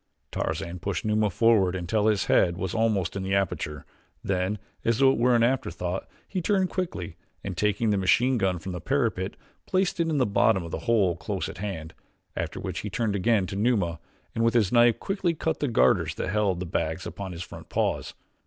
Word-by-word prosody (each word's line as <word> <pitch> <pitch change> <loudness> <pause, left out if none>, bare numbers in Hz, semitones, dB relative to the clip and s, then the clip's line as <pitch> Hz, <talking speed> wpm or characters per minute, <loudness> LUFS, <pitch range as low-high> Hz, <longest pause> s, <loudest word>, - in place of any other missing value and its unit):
Tarzan 85 +3 -3
pushed 95 -2 -3
Numa 105 0 +2
forward 100 -2 +3
until 100 +4 0
his 105 -3 +2
head 85 -1 +3
was 95 -2 -3
almost 110 -6 +1
in 100 - -2
the 95 +1 0
aperture, 80 -6 -2 0.4
then 95 +2 0 0.3
as 115 -1 +2
though 135 0 +6
it 135 - -1
were 125 +1 +4
an 115 - +4
afterthought, 90 -7 -1 0.2
he 185 - -3
turned 190 0 +1
quickly 165 - -4 0.3
and, 95 -2 -4
taking 105 +4 +1
the 100 - +2
machine 120 +6 +3
gun 95 -2 +1
from 95 +3 -6
the 90 -2 -5
parapet, 110 - 0 0.3
placed 185 -1 0
it 165 -1 +1
in 155 - 0
the 130 - +3
bottom 100 -2 +3
of 85 - -7
the - - -3
hole 100 -7 +3
close 90 +3 -3
at 80 +2 -8
hand, 85 -6 -5 0.4
after - - -3
which - - -4
he 105 - -4
turned 105 +2 -1
again 100 0 +2
to 95 +2 -6
Numa, 100 -6 +1 0.3
and 115 - 0
with 115 +1 +2
his 105 -5 +3
knife 120 -1 +5
quickly 190 -4 -1
cut 160 +1 -1
the 145 - 0
garters 120 - +3
that - - -3
held 100 -2 +1
the 90 - -3
bags 80 0 -2
upon 100 -2 -6
his 85 0 -6
front - - -11
paws. - - -1
100 Hz, 210 wpm, -26 LUFS, 90-115 Hz, 0.4 s, though